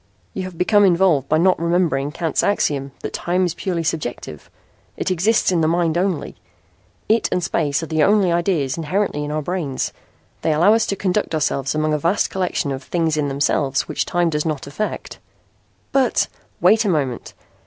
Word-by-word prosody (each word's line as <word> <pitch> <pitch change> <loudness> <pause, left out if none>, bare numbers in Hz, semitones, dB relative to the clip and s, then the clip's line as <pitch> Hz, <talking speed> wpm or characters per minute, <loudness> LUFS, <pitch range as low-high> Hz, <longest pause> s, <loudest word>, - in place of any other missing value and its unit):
You - - -4
have 185 -2 -9
become 205 +4 +4
involved 175 -7 +3
by 155 - +3
not 180 +3 +3
remembering 170 -5 +1
Kant's 165 -1 -1
axiom 140 -8 0
that - - -5
time 180 +2 0
is 175 - -2
purely 175 -3 -3
subjective. 120 - -4 0.5
It - - -1
exists 190 +4 +2
in 175 -2 +2
the 155 - +2
mind 165 -1 +1
only. 180 -2 -1 0.7
It 220 +2 +2
and 180 - 0
space 150 -3 0
are - - -2
the 160 -1 -1
only 200 +1 +4
ideas 170 -6 0
inherently 165 -1 -1
in 145 - -4
our 155 0 -2
brains. 160 -6 -3 0.5
They 160 - +1
allow 175 +8 +5
us 225 0 +2
to 200 - -1
conduct 190 -3 -1
ourselves 140 -2 -1
among 155 0 +1
a 150 - 0
vast 170 +7 +1
collection 180 -5 -1
of 135 -1 -4
things 165 +1 -1
in 150 -1 0
themselves 140 0 0
which - - -2
time 175 -1 +1
does 150 -1 0
not 155 -4 -3
affect." 145 +10 -5 0.7
"But 265 -2 +2 0.2
" - - -38
"Wait 220 +1 +5
a 210 - 0
moment. 140 -8 -2
165 Hz, 185 wpm, -20 LUFS, 150-185 Hz, 0.7 s, allow